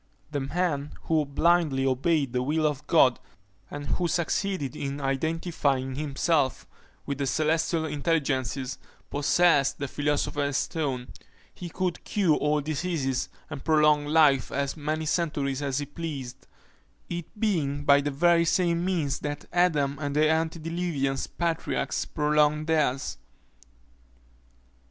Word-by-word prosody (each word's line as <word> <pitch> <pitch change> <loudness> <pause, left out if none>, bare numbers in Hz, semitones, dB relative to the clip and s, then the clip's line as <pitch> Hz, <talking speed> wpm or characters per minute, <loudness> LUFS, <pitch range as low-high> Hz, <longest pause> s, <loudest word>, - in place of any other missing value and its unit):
The 145 - -1
man 145 0 -2
who 155 -2 +1
blindly 150 -2 +2
obeyed 135 +1 +1
the 125 - +1
will 155 +4 0
of 150 -3 -1
God, - - +4 0.5
and 145 0 -6
who 175 +5 0
succeeded 170 -3 -1
in 140 0 -4
identifying 140 -1 -1
himself 145 0 0 0.4
with 140 0 -4
the 140 - 0
celestial 160 +2 +1
intelligences, 140 -4 -1 0.3
possessed 145 0 +3
the 140 - -3
philosopher's 145 0 -1
stone 135 -7 -2 0.4
he 175 - -7
could 180 +1 -3
cure 185 -7 +2
all 150 0 +1
diseases, 150 -3 -2 0.2
and 145 -3 -7
prolong 150 -2 +3
life 150 -4 +4
to - - -7
as 140 0 -1
many 155 +1 -2
centuries 145 -4 -1
as 135 -2 -1
he 145 - -1
pleased; 140 -4 -7 0.6
it 175 +5 -7
being 150 -10 0
by 140 0 +6
the 145 - -1
very 170 +4 +3
same 170 0 +1
means 170 -7 0
that 145 -1 -5
Adam 150 -6 +2
and 145 -1 -2
the 155 +1 +4
antediluvian 160 -2 -1 0.2
patriarchs 170 -2 -1
prolonged 150 0 +2
theirs. 150 -5 0
150 Hz, 130 wpm, -27 LUFS, 140-165 Hz, 0.6 s, by